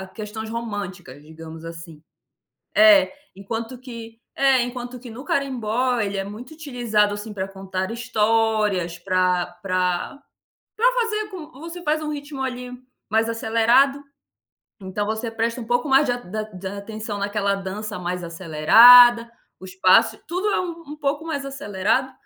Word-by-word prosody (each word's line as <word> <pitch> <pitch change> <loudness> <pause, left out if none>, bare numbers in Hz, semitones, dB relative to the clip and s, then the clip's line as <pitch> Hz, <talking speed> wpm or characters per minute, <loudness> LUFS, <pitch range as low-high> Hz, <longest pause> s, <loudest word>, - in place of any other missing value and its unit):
a - - -8
questões 215 +2 -7
românticas, 205 - -6
digamos 160 +1 -11
assim. 165 -2 -10 0.7
É, 320 -2 +6 0.2
enquanto 225 +5 -5
que 230 -3 -10
é, 270 -2 +3
enquanto 245 0 -6
que 245 -1 -10
no 250 +5 -9
Carimbó, 250 -3 0
ele 200 -2 -2
é 195 - -2
muito 225 +9 -9
utilizado, 240 -9 0
assim, 210 +1 -7
para 195 -2 -3
contar 190 0 -5
histórias, 215 -6 0
para 185 -1 +1 0.2
para 185 +5 -1 0.6
para - - +3
fazer 430 -2 -2
com 355 -6 -9
você 335 +2 -8
faz 310 -1 0
um 305 -1 -3
ritmo, 285 -1 -6
ali, 250 -1 -5 0.4
mais 225 +2 +1
acelerado. 230 +5 +2 0.8
Então 195 +2 -3
você 220 +2 -3
presta 230 +2 -2
um 225 - -7
pouco 245 +5 0
mais 270 +2 +5
de 245 - +1
a - - -2
da 215 -2 -5
de 195 -3 -10
atenção 205 +2 -6
naquela 200 0 0
dança 195 +1 -5
mais 180 0 -4
acelerada, 230 +9 +7 0.3
o - - -11
espaço, 185 0 +3
tudo 365 +5 -2
é - - +1
u 335 -2 -6
um 300 - -7
pouco 295 +1 -2
mais 285 -4 -3
acelerado. 260 -1 -1
225 Hz, 155 wpm, -22 LUFS, 195-260 Hz, 0.8 s, acelerada